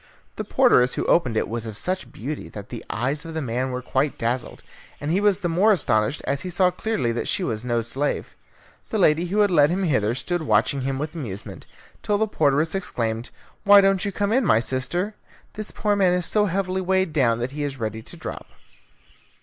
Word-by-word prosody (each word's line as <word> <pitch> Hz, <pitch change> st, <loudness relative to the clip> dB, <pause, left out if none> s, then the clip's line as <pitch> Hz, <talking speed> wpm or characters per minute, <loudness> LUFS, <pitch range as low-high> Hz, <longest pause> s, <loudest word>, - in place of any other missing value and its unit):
The -, -, -4 dB
porteress 125 Hz, 0 st, +3 dB
who -, -, -2 dB
opened 125 Hz, -10 st, +2 dB
it -, -, 0 dB
was 115 Hz, 0 st, -4 dB
of 110 Hz, -2 st, -7 dB
such 185 Hz, +9 st, -3 dB
beauty 145 Hz, +6 st, -6 dB
that 100 Hz, -1 st, -9 dB
the 120 Hz, -, -7 dB
eyes 135 Hz, +7 st, -2 dB
of 165 Hz, -1 st, -8 dB
the -, -, -1 dB
man 125 Hz, +1 st, -2 dB
were 125 Hz, 0 st, -4 dB
quite 135 Hz, +3 st, 0 dB
dazzled, 120 Hz, +1 st, -3 dB, 0.4 s
and 145 Hz, +2 st, -3 dB
he 190 Hz, +4 st, +2 dB
was 205 Hz, -1 st, +3 dB
the 175 Hz, -, 0 dB
more 185 Hz, +6 st, +3 dB
astonished 115 Hz, -, +1 dB
as 140 Hz, +1 st, -1 dB
he 185 Hz, -, -5 dB
saw 180 Hz, +1 st, +3 dB
clearly 180 Hz, -, -1 dB
that 115 Hz, -, -3 dB
she -, -, 0 dB
was 110 Hz, 0 st, -2 dB
no 120 Hz, -2 st, 0 dB
slave. 135 Hz, +5 st, -2 dB, 0.6 s
The 220 Hz, -, -1 dB
lady 170 Hz, -2 st, +3 dB
who 205 Hz, +4 st, +1 dB
had 205 Hz, -2 st, +3 dB
led 150 Hz, -4 st, +5 dB
him 185 Hz, +3 st, -1 dB
hither 120 Hz, -, +1 dB
stood 175 Hz, +7 st, -2 dB
watching 140 Hz, -2 st, +2 dB
him 135 Hz, +1 st, -2 dB
with 150 Hz, +2 st, -4 dB
amusement, 115 Hz, -, -7 dB, 0.3 s
till 205 Hz, -, +1 dB
the 220 Hz, -, +2 dB
porteress 155 Hz, -3 st, +1 dB
exclaimed, 115 Hz, -11 st, -2 dB, 0.3 s
"Why 205 Hz, -1 st, +8 dB
don't 195 Hz, -1 st, +3 dB
you 200 Hz, -, -1 dB
come 205 Hz, +1 st, -1 dB
in, 260 Hz, +2 st, +3 dB
my 110 Hz, -, +4 dB
sister? 135 Hz, -, -2 dB, 0.4 s
This 215 Hz, 0 st, -4 dB
poor 210 Hz, -1 st, 0 dB
man 190 Hz, -3 st, +3 dB
is 180 Hz, -1 st, -1 dB
so 210 Hz, +3 st, +2 dB
heavily 190 Hz, 0 st, -1 dB
weighed 190 Hz, -2 st, +1 dB
down 120 Hz, -6 st, +3 dB
that 120 Hz, +2 st, -3 dB
he 150 Hz, +1 st, -5 dB
is 140 Hz, -2 st, -3 dB
ready 110 Hz, -2 st, -4 dB
to -, -, -10 dB
drop." -, -, -7 dB
150 Hz, 215 wpm, -23 LUFS, 125-190 Hz, 0.6 s, Why